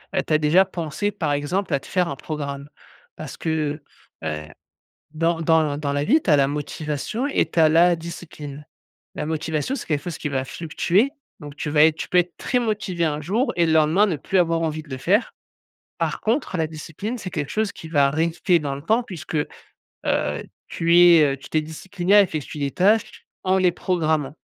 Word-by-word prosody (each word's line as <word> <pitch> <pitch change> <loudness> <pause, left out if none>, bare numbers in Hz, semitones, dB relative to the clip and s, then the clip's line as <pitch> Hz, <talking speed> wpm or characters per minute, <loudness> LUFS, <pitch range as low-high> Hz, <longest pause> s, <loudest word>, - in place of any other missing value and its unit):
heu, - - +3
tu - - -6
as 155 - +6
déjà 155 +5 +4
pensé, 175 +1 -3
par 160 -8 -2
exemple, 160 +8 -1
à 140 - +2
te - - -15
faire 180 -2 +1
un 140 - -4
programme? 140 -1 -6 0.5
Parce - - -8
que, 155 -2 -2 0.4
heu 80 - -1
heu, 75 0 -5 0.7
dans 165 +1 0
dans 160 -3 +2
l - - -6
dans 145 -2 -2
la 145 0 0
vie, 290 - +4
tu 170 - +1
as - - +7
la 140 -1 +3
motivation 150 - -3
et - - +1
tu 170 - -1
as 155 - +6
la 170 +2 +5
discipline. 150 -3 -9 0.5
La - - -3
motivation, 160 - -2
c'est - - -6
quelque 150 -3 -1
fosse 175 -3 -5
qui 150 - -3
va 135 -2 -1
fluctuer, 175 - 0 0.3
donc 145 0 -10
tu 150 0 -3
vas 150 +1 +5
être 160 -1 +4
tu - - -5
peux 180 - +4
être 175 -1 0
très 250 - 0
motivé 210 -7 -1
un 150 0 -2
jour 220 - 0
et 170 - +3
le 160 - +1
lendemain 160 +5 +4
ne 175 - -1
plus 170 +7 -3
avoir 165 -2 +2
envie 155 -1 -2
de 150 - -19
le 130 - -4
faire. 200 - +1 0.7
Par - - -1
contre, 225 -3 -1
la 160 - +1
discipline, 160 +9 -6
c'est 190 - -6
quelque 150 -5 -4
chose 215 -1 0
qui 160 - -11
va 145 -3 +3
rester 165 +3 +1
dans 145 -4 -3
le 140 - -8
temps 225 +9 +1
puisque, 175 -7 -7 0.5
heu, 75 -1 -2 0.2
tu 170 +1 +2
es, 175 -2 +8
heu, - - -17
tu 135 - -13
t'es 155 - +1
discipliné 180 +5 -1
à 205 - +9
effectuer 155 -5 -3
des 140 -1 -1
tâches 210 +4 +1 0.2
en 185 0 +3
les 185 -2 +3
programmant. 160 -6 -1
160 Hz, 215 wpm, -23 LUFS, 150-180 Hz, 0.7 s, à